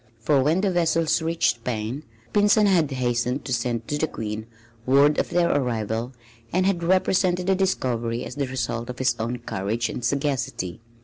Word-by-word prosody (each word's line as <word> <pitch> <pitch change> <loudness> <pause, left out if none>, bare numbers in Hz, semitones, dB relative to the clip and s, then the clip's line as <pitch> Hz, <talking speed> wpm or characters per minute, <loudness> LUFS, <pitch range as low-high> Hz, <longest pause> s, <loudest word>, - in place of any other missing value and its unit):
For 140 +4 +2
when 160 +7 +2
the 195 -1 +1
vessels 165 -2 +2
reached 160 -7 +1
Spain, 115 +2 -3 0.3
Pinzon 205 +1 +4
had 175 -7 +3
hastened 125 0 -1
to 130 - -2
send 115 -1 -1
to 150 - -2
the 160 - +1
Queen 110 -3 -5 0.4
word 140 +3 +5
of - - -1
their 170 -2 +2
arrival 115 -2 -1 0.4
and 185 +1 +2
had 190 -3 +1
represented 185 0 +2
the 190 - +3
discovery 125 -11 -1
as - - -7
the 140 -2 -2
result 120 -2 -3
of 125 - -6
his 125 -2 +1
own 115 +2 -2
courage 115 0 -2
and 125 - -5
sagacity. 135 - -2
130 Hz, 175 wpm, -24 LUFS, 115-170 Hz, 0.4 s, word